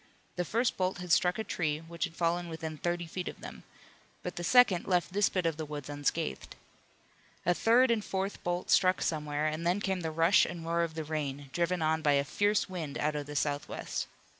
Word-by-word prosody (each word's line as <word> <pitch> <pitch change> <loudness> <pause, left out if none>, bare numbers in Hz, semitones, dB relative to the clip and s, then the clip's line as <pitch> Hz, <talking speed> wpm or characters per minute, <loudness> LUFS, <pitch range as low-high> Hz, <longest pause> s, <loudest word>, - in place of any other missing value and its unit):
The 180 - -1
first 235 +5 0
bolt 185 0 0
had 180 -1 -6
struck 180 +1 +4
a 220 - -2
tree 155 -7 -1
which 165 +2 -4
had 165 - -10
fallen 175 +1 0
within 160 -1 -5
thirty 175 0 -1
feet 180 +2 -5
of - - -6
them, - - -9 0.6
but 180 - -4
the 175 - -4
second 225 -4 +5
left 180 -1 +1
this 205 0 +3
bit 185 -2 -1
of 165 -2 0
the 160 - -3
woods 145 -1 -6
unscathed. 145 +3 -2 0.9
A 175 - +4
third 235 +6 +4
and 225 -2 +2
a - - -12
fourth 195 +1 -3
bolt 175 +1 -2
struck 185 -1 +4
somewhere, 150 -1 -1
and 155 +1 -1
then 175 +3 +2
came 190 -2 -1
the 160 - -2
rush 165 +5 +4
and 170 -1 -4
roar 170 +1 +1
of 165 -2 -2
the 160 - -3
rain, 145 -3 -4
driven 175 0 0
on 160 +1 +1
by 150 -2 +3
a 140 0 +3
fierce 205 +8 +1
wind 165 -7 -5
out 150 0 0
of 145 -1 -4
the 145 - -7
southwest. 145 0 -2
170 Hz, 220 wpm, -31 LUFS, 155-185 Hz, 0.9 s, second